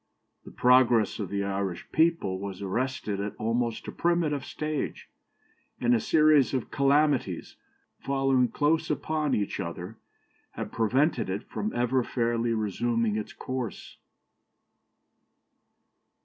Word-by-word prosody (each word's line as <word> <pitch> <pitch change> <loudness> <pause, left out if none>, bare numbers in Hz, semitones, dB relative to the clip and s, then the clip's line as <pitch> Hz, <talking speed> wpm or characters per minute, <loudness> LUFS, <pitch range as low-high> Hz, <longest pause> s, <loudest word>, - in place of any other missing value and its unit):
The - - -10
progress 125 -4 +4
of 100 -4 -3
the 100 0 -1
Irish 95 -2 -3
people 160 - +2
was 100 -1 -6
arrested 105 0 -2
at 100 +1 -4
almost 115 +1 -1
a - - -4
primitive 165 -5 0
stage, 155 -1 -4 0.7
and 120 0 +3
a 120 - +4
series 150 -3 +4
of 130 - -3
calamities, 140 - +1 0.4
following 135 -2 +2
close 160 +5 +1
upon 155 -3 0
each 100 -2 -2
other, 90 +5 -6 0.6
have - - -5
prevented 120 - +1
it 95 +2 -3
from 215 - -4
ever 125 +1 +1
fairly 115 -1 0
resuming 115 +1 0
its 110 -1 -4
course. 130 -6 -6
120 Hz, 120 wpm, -27 LUFS, 105-140 Hz, 0.7 s, progress